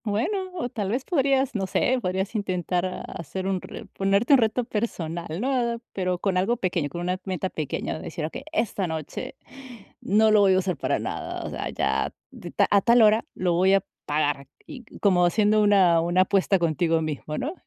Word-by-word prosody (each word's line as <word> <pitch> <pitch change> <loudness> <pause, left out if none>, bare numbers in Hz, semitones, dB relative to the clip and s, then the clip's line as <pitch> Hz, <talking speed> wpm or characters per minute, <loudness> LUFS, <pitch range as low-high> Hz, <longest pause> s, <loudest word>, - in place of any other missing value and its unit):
Bueno, 370 - -1
o 340 - -2
tal 205 -5 -3
vez 250 +5 -2
podrías, 275 -5 +1
no 195 -4 -2
sé, 255 +6 +1
podrías 190 +1 -2
intentar 185 -3 -2
hacer 185 +2 -6
un 190 -1 0 0.4
ponerte 200 +7 +2
un 275 - +7
reto 230 +2 +1
personal, 170 -8 -4
¿no? 240 -1 0
Pero 180 -2 -1
con 185 0 -1
algo 200 +7 +1
pequeño, 175 -7 -1
con 175 +5 -6
una 180 +1 -2
meta 190 -1 -2
pequeña, 155 +1 -3
decir: 160 -1 -5
"Okey, 160 - -6
esta 215 - -1
noche 160 -2 -5 0.7
no 215 +2 +3
lo 215 - +6
voy 195 -1 +5
a - - +3
usar 185 -1 0
para - - -1
nada". - - -5
O - - -5
sea, - - -4
ya - - -1 0.2
d - - -9
a 200 - +4
tal 235 +2 +5
hora 215 +1 +4
lo 180 -2 0
voy 185 +3 +3
a 195 - +1 0.2
pagar 145 -2 0 0.2
y 255 -4 -10 0.2
como 185 -3 +4
haciendo 210 +4 +3
una 190 -5 +5
una 175 +2 +2
apuesta 195 +1 +2
contigo 165 -1 +1
mismo, 150 0 -4
¿no? 295 +6 -3
190 Hz, 185 wpm, -25 LUFS, 175-220 Hz, 0.7 s, un